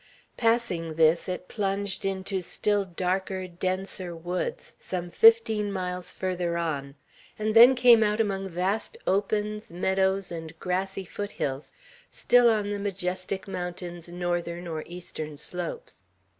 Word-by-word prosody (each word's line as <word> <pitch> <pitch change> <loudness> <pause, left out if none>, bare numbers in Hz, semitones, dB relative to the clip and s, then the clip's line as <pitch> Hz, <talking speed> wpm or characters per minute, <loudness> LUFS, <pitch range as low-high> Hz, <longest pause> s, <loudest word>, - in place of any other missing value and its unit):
Passing 225 -9 0
this, 165 +2 +3
it 180 0 -4
plunged 200 -2 -2
into 190 0 -2
still 205 +3 0
darker, 185 +1 -2
denser 185 0 -3
woods, 175 +2 -4
some 175 -1 -4
fifteen 225 -2 +5
miles 180 -2 -4
farther 180 -2 -2
on, 140 -5 -3 0.4
and 215 +1 -1
then 240 +3 +9
came 245 -2 +7
out 210 0 +2
among 195 -3 0
vast 190 - -1
opens, 210 +1 0
meadows, 190 +2 +1
and 165 -1 -7
grassy 190 +1 -2
foot 205 +3 -5
hills, 135 +1 -3 0.4
still 245 -1 +5
on 210 -2 +1
the 205 - -2
majestic 190 0 -3
mountain's 175 -2 -5
northern 175 0 -2
or 160 -2 -4
eastern 155 -4 -7
slopes. 175 - -6
185 Hz, 130 wpm, -27 LUFS, 175-205 Hz, 0.4 s, then